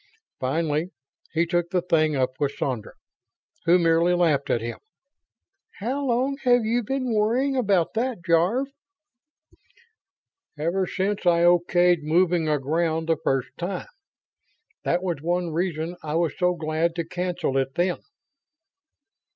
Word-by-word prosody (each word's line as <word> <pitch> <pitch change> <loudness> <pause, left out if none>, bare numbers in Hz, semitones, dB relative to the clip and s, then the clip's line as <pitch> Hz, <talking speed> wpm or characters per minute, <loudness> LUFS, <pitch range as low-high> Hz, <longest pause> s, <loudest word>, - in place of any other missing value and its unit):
Finally 155 +4 -1 0.4
he 165 +1 +1
took 175 0 0
the 180 -2 0
thing 155 -3 +2
up 130 -1 -1
with 140 -1 0
Sandra, 125 -6 -3 0.7
who 170 +2 +6
merely 170 +1 +3
laughed 155 -6 +1
at 120 - +2
him. 115 +1 -5 0.9
"How 260 +7 -3
long 260 +2 0
have 245 -2 +4
you 235 +2 +1
been 255 +1 -2
worrying 240 +6 +1
about 200 -9 +1
that, 230 -6 -2
Jarve?" 185 +11 +2 1.9
"Ever 175 +5 0
since 195 0 -2
I 170 -1 +4
okayed 175 0 +4
moving 165 +1 +2
aground 160 +3 0
the 165 - +3
first 135 -1 0
time. 180 +1 -4 0.9
That 175 +2 0
was 175 -6 -2
one 175 +1 -1
reason 165 0 -2
I 150 0 -4
was 165 -3 0
so 180 -1 +1
glad 160 +1 -1
to 170 -1 -2
cancel 180 -4 -2
it 135 0 -3
then." 175 0 0
175 Hz, 135 wpm, -24 LUFS, 160-190 Hz, 1.9 s, who